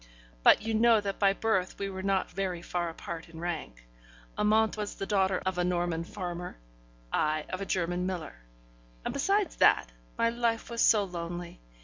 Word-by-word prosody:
But - - +6
you 225 0 -1
know 225 0 +5
that 200 -1 -4
by 195 -1 +5
birth 195 -3 0
we 200 - -2
were 190 -1 -5
not 195 0 0
very 185 -3 -3
far 175 -1 -2
apart 165 0 -7
in 165 -1 -11
rank: 160 - -5 0.5
Amante 220 +1 +3
was 210 -1 -3
the 195 - -4
daughter 190 -2 +1
of 190 -1 -1
a - - +3
Norman 175 -2 0
farmer, 175 - -6 0.6
I 155 0 +1
of 185 - -4
a 195 - -4
German 180 0 0
miller; 175 - -5 0.7
and - - -2
besides 390 +6 +1
that, - - +4 0.3
my 230 - +3
life 235 -1 -1
was 235 - -1
so 210 -2 +5
lonely! 175 -1 -6
185 Hz, 175 wpm, -29 LUFS, 175-210 Hz, 0.7 s, But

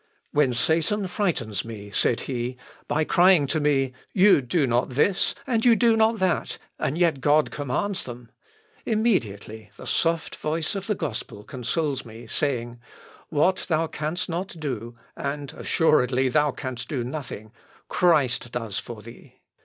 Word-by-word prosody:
"When 145 -3 +3
Satan 165 - +1
frightens 170 - -1
me," 105 -3 -8
said 115 - +1
he, 125 -1 -3 0.3
"by 150 +2 +1
crying 175 -1 +5
to 155 +3 0
me: 135 -3 +1 0.2
You 190 -5 +6
do 140 +4 +1
not 120 0 +1
this, 150 +9 +2
and 230 -4 0
you 240 -2 +6
do 230 -1 +4
not 220 +1 +3
that, 185 -3 0 0.2
and 145 - -1
yet 165 -6 +2
God 150 +2 +3
commands 150 +8 -2
them! 120 -1 -9 0.5
immediately 110 - -1
the - - -10
soft 165 -1 0
voice 155 +1 -1
of 195 -1 -5
the 210 - +1
gospel 110 - -5
consoles 135 +3 -2
me, 115 0 -11
saying: 120 -5 -1 0.5
What 170 +5 +1
thou 160 0 +2
canst 155 +2 -3
not 175 0 -4
do 120 -6 -4 0.2
(and 140 0 -4
assuredly 130 -5 +2
thou 150 +3 +3
canst 130 -3 -5
do 130 -5 -1
nothing,) 125 -5 -6 0.4
Christ 135 -9 +2
does 115 -5 -3
for 115 -3 -9
thee." 115 - -13
145 Hz, 150 wpm, -25 LUFS, 120-170 Hz, 0.5 s, You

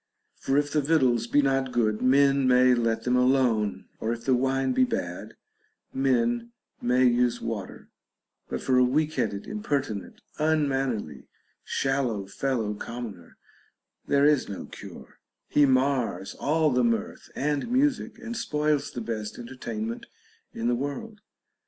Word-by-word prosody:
For 135 - 0
if 145 0 +1
the 150 - +2
victuals 130 -6 +2
be 145 +4 +3
not 135 -1 +1
good, 110 -3 +1
men 135 +1 +4
may 125 0 +5
let 115 -2 0
them 125 0 +1
alone, 120 -7 +2
or 110 - -1
if 115 0 -5
the 130 - +3
wine 135 +1 +1
be - - +4
bad, 240 -2 -3 0.6
men 120 -3 +1 0.3
may 125 +1 +3
use 120 0 +2
water; 105 -5 -6 0.6
but - - -3
for 130 -1 +3
a - - +6
weak 150 +5 +1
headed, 105 -7 -2
impertinent, 145 - -3 0.2
unmannerly, 135 - 0 0.4
shallow 130 -7 -1
fellow 110 +1 -2
commoner 105 -5 -8 0.7
there 140 0 +3
is 150 -6 +3
no 100 - -6
cure; - - -12 0.3
he 145 -1 +4
mars 130 -8 +1
all 155 +1 +1
the 125 0 +2
mirth 115 -3 -1
and 145 - -1
music, 265 +2 +1
and 235 0 -6
spoils 150 -8 0
the 120 - -6
best 110 -2 -4
entertainment 115 -2 -5 0.4
in 115 - -3
the 120 - +2
world. 145 - -4
130 Hz, 140 wpm, -26 LUFS, 115-140 Hz, 0.7 s, a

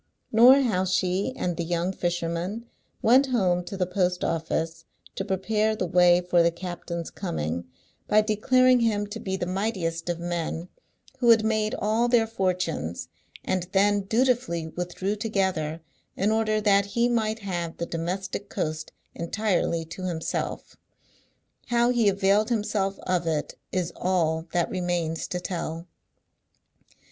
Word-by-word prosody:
Nor 250 +5 +7
how 210 -8 +1
she 185 +4 0
and 175 -2 -2
the 170 - -1
young 175 +2 -1
fisherman 175 +5 -2 0.4
went 260 +5 +5
home 185 -8 +1
to 195 - -6
the 185 - +1
post 180 0 0
office 165 0 -2 0.3
to 195 - -3
prepare 210 +3 0
the 185 - -2
way 180 0 +5
for 180 -1 +3
the 170 - +4
captain's 170 -1 -6
coming, 85 - -3 0.4
by 215 +1 +5
declaring 250 +4 +3
him 215 -3 +1
to 210 +2 -7
be 190 -2 -3
the 180 - -2
mightiest 180 -3 -2
of 170 -1 -2
men, 170 0 -3 0.5
who 240 -2 +3
had 225 -1 +6
made 215 -1 +1
all 220 +3 +1
their 240 -2 +4
fortunes, 180 - -2 0.4
and 180 -1 -1
then 205 +1 +3
dutifully 225 -6 0
withdrew 180 +4 -3
together, 190 -7 -1 0.4
in 205 +3 +2
order 220 -1 +1
that 200 -1 +3
he 235 +4 +1
might 220 -2 0
have 175 -5 -4
the 170 - -2
domestic 185 +4 -4
coast 155 -4 -3 0.2
entirely 170 -2 -1
to 175 +3 -7
himself. 165 -2 -4 0.9
How 240 0 +3
he 235 -4 +3
availed 200 +3 +2
himself 205 -4 0
of 180 -2 0
it 155 -2 -1 0.2
is 180 -2 -2
all 165 -3 0
that 175 -1 0
remains 175 -3 -2
to 180 - -3
tell. 170 -2 -4
185 Hz, 145 wpm, -26 LUFS, 170-215 Hz, 0.9 s, Nor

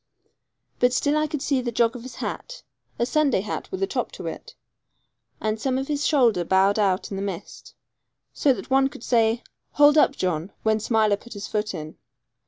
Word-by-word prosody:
But 245 0 +3
still 290 +3 +1
I 305 0 +1
could 300 -2 -4
see 275 -4 +1
the 240 -1 -3
jog 230 0 +2
of 245 - -7
his 245 -1 -9
hat - - -6 0.3
a 235 - +1
Sunday 280 -5 +2
hat 210 - -5
with 380 0 -3
a - - +4
top - - -3
to - - -8
it - - -7 0.8
and 215 0 -2
some 260 -1 0
of 270 +2 -3
his 295 0 0
shoulder 235 - +3
bowed 190 +4 +3
out 195 -1 +1
in 195 - -3
the - - -3
mist, 195 -4 -7 0.6
so 285 - +3
that 260 - -4
one 270 0 +4
could 235 - -12
say 230 -1 +2 0.3
'Hold 295 +1 +6
up, 280 - +4
John,' 180 - -2
when 220 0 +2
Smiler 215 -2 +2
put 235 +3 -12
his 205 -1 -6
foot 210 -2 -2
in. 155 -1 -8
235 Hz, 200 wpm, -24 LUFS, 205-275 Hz, 0.8 s, Hold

